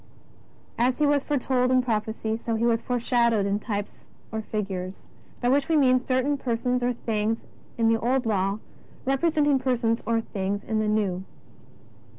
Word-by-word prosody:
As 250 +1 +2
He 300 - +3
was 285 -1 +3
foretold 255 -3 +1
in 255 0 +3
prophecy, 220 -1 -1
so 230 0 -2
He 225 +1 0
was 230 -1 +2
foreshadowed 235 -4 +2
in 200 +1 0
types 205 -2 -5 0.3
or 220 -1 -2
fig 210 -2 -3
ures, 185 0 -5 0.4
by 245 - +2
which 275 +2 +2
we 325 - +3
mean 255 -3 +5
certain 260 +3 0
persons 250 0 0
or 245 0 +1
things 225 -2 -2 0.3
in 230 -1 +3
the 225 0 +3
Old 255 +2 +1
Law 200 -2 +1 0.5
representing 290 +1 +2
persons 240 -3 +1
or 230 0 +2
things 200 -2 -3
in 220 -1 -1
the 215 - 0
jSTew. 205 -4 0
235 Hz, 165 wpm, -26 LUFS, 215-255 Hz, 0.5 s, mean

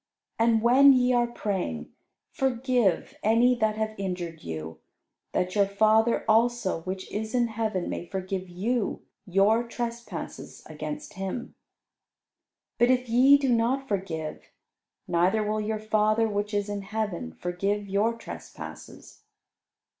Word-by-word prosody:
And 225 -1 +3
when 270 +4 +7
ye 250 -1 +3
are 240 -1 +3
praying, 185 - -3 0.4
forgive 250 -4 +1
any 235 +3 +4
that 215 -2 +2
have 220 0 -2
injured 180 -4 -4
you, 80 0 -6 0.5
that 180 0 -1
your 200 -2 +3
Father 220 +3 +3
also 225 -5 +2
which 185 +2 -6
is 220 +2 -3
in 240 -1 +2
heaven 215 -5 -2
may 175 - -4
forgive 190 -1 -4
you 210 +5 -2 0.2
your 200 +5 +4
trespasses 235 0 -6
against 295 0 -6
Him. 195 +5 -5 1.3
But 240 - +5
if 255 0 +2
ye 260 +5 +6
do 275 -2 -1
not 250 +4 +1
forgive, 170 -6 -4 0.6
neither 180 +5 +2
will 215 +1 -1
your 215 +1 -2
Father 215 +1 +2
which 205 0 -2
is 205 -1 -1
in 205 -1 -3
heaven 195 - -4
forgive 200 +4 -2
your 205 +4 +1
trespasses." 230 - -10
215 Hz, 130 wpm, -27 LUFS, 190-235 Hz, 1.3 s, when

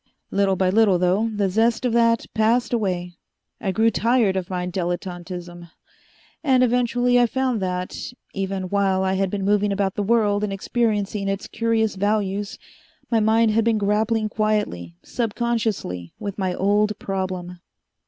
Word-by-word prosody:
"Little 195 -1 +2
by 185 0 +1
little, 205 -3 +4
though, 185 +5 +1
the 205 -2 0
zest 225 +5 +1
of 240 - +1
that 230 -1 +3
passed 225 +3 +2
away. 180 -5 -2 0.4
I 195 - -1
grew 225 +4 +3
tired 230 -5 +2
of 185 -2 -3
my 180 -1 -2
dilettantism. 175 -1 -5 0.7
And 260 -4 +4
eventually 245 0 +2
I 240 - +4
found 255 -2 -1
that, 180 +2 -3 0.2
even 195 -1 -3
while 195 -1 +1
I 190 0 +1
had 190 0 0
been 195 0 -3
moving 205 0 +2
about 195 -1 0
the 210 - -2
world 210 -1 +2
and 210 - -1
experiencing 205 -1 -1
its 195 0 -3
curious 225 -1 0
values, 205 0 -1 0.5
my 230 - +4
mind 220 +1 +3
had 225 +1 +2
been 225 -1 +2
grappling 215 +2 +1
quietly, 210 - -1
subconsciously, 220 - -2
with 200 -2 -5
my 185 -2 -1
old 210 +2 +1
problem. 185 -2 -4
205 Hz, 155 wpm, -23 LUFS, 190-225 Hz, 0.7 s, little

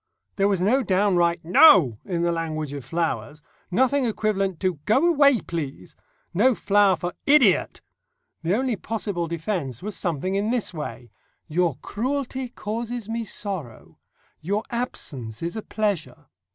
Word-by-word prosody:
There 195 0 +3
was 195 -3 +1
no 240 +9 +3
downright 180 -5 +2
"No!" 175 - +6
in 175 -3 -2
the 170 - +2
language 155 -3 -3
of 140 -2 -6
flowers, 145 -1 -3 0.3
nothing 260 +8 +2
equivalent 200 -6 -1
to 185 -5 0
"Go 220 +10 +3
away, 280 -7 +4
please," 140 - -6 0.4
no 235 +7 +4
flower 200 -2 +3
for 175 0 -4
"Idiot!" 275 -9 +4 0.6
The 170 +4 +1
only 255 0 0
possible 200 -6 -3
defence 165 - -3
was 210 -1 -4
something 175 +1 -2
in 200 +2 0
this 235 -6 -1
way: 150 -6 -7 0.4
"Your 170 -2 +1
cruelty 260 +2 -3
causes 230 0 -5
me 230 +1 -2
sorrow," 190 - -6 0.4
"Your 200 +6 -1
absence 135 - -4
is 170 +4 -3
a 220 - -3
pleasure." 195 -9 -3
190 Hz, 140 wpm, -24 LUFS, 165-225 Hz, 0.6 s, No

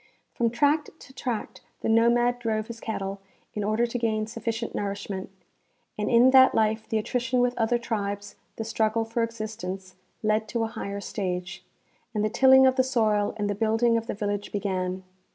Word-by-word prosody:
From 235 -1 +1
tract 290 +6 +2
to 265 - -14
tract 245 -4 -4 0.2
the - - -2
nomad 240 +2 +3
drove 220 -2 -1
his 230 0 -8
cattle 195 -3 -4 0.3
in 210 - -3
order 215 +3 +1
to 240 +1 -3
gain 220 -2 0
sufficient 230 +1 -4
nourishment, 200 -1 -4 0.7
and 210 0 -2
in 245 +2 +6
that 260 0 +7
life 220 0 +1
the 220 - +1
attrition 245 +3 0
with 245 0 +2
other 230 +1 +2
tribes, 205 -3 -4 0.2
the 225 - -4
struggle 220 0 0
for 230 +1 -2
existence, 215 -5 -5 0.3
led 215 +1 +1
to 230 +1 -1
a - - 0
higher 200 0 -5
stage, 180 -2 -4 0.5
and 210 0 +1
the 215 - -1
tilling 265 +2 +7
of 260 0 +3
the 260 - +5
soil 215 -5 +1
and 205 -1 -1
the 205 - 0
building 225 +3 +2
of 230 0 -1
the - - -3
village 205 -1 -3
began. 185 -2 -2
220 Hz, 180 wpm, -26 LUFS, 205-235 Hz, 0.7 s, that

